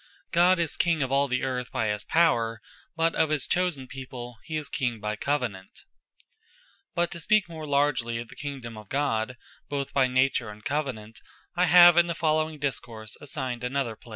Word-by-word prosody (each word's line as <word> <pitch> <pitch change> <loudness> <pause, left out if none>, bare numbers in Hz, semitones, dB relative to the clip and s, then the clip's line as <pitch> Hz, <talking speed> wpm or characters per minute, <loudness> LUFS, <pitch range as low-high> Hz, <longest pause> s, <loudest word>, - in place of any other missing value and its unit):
God 180 +2 +5
is 170 -3 -1
King 165 -4 +2
of 130 - -3
all 140 +1 +3
the 125 -1 -1
Earth 125 -1 -2
by 110 - 0
his 105 0 -2
Power: 115 -9 +2 0.4
but 165 0 +2
of 160 - +2
his 150 -4 0
chosen 175 -7 0
people, 125 -2 -8
he 160 -1 -3
is 150 -2 -4
King 120 -5 -2
by 105 0 -2
Covenant. 115 -7 -3 1.1
But 175 0 +1
to 170 - -5
speake 210 +3 +3
more 160 -2 -7
largly 140 -5 +1
of 115 0 -6
the - - -12
Kingdome 135 -6 -6
of 105 -2 -14
God, 125 -4 -1 0.3
both 140 -1 -3
by 135 -2 +4
Nature, 130 -2 +1
and 105 0 -12
Covenant, 130 -7 -3 0.4
I 180 +1 +3
have 175 0 +8
in 175 0 +6
the 170 - -2
following 155 -1 +1
discourse 115 -6 -4
assigned 130 -4 -4
an 125 +2 -3
other 125 -5 -1
place. 115 - -18
135 Hz, 190 wpm, -27 LUFS, 120-155 Hz, 1.1 s, have